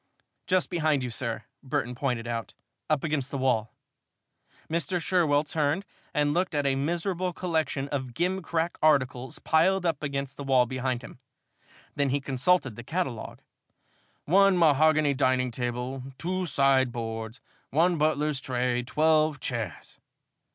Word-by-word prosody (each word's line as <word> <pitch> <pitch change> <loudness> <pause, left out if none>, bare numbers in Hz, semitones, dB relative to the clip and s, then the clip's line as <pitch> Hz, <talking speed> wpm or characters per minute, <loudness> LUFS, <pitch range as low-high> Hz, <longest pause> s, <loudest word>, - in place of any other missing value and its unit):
"Just 185 0 +1
behind 155 -5 +1
you, 125 - -3
sir," 115 0 -3 0.2
Burton 125 -2 -2
pointed 125 -2 -2
out, 115 -1 -4 0.3
"up 155 -3 +1
against 145 -4 -1
the 140 - -3
wall." 125 -4 +1 1.0
Mr. 170 +2 -1
Sherwell 160 -4 +2
turned 155 +4 -1 0.3
and 145 0 +1
looked 180 -1 0
at 145 -1 +1
a 135 - +3
miserable 175 +6 -1
collection 160 -6 -1
of 130 -4 -4
gimcrack 170 -2 -1
articles 130 -4 +2
piled 180 +4 +2
up 165 -4 0
against 140 -2 -3
the 140 - -5
wall 130 -2 +4
behind 130 0 -2
him. 125 - -11 0.7
Then 140 -1 +1
he 140 +2 +1
consulted 135 -1 +1
the 120 - -8
catalogue. 135 -6 -4 0.8
"One 195 +3 +5
mahogany 155 -2 +4
dining 130 -2 +1
table, 125 +2 -3 0.2
two 185 +1 -2
sideboards, 120 -5 0 0.3
one 170 +3 +2
butler's 150 -2 +1
tray, 125 -1 0
twelve 155 +2 +2
chairs. 115 - -5
140 Hz, 135 wpm, -27 LUFS, 125-160 Hz, 1.0 s, One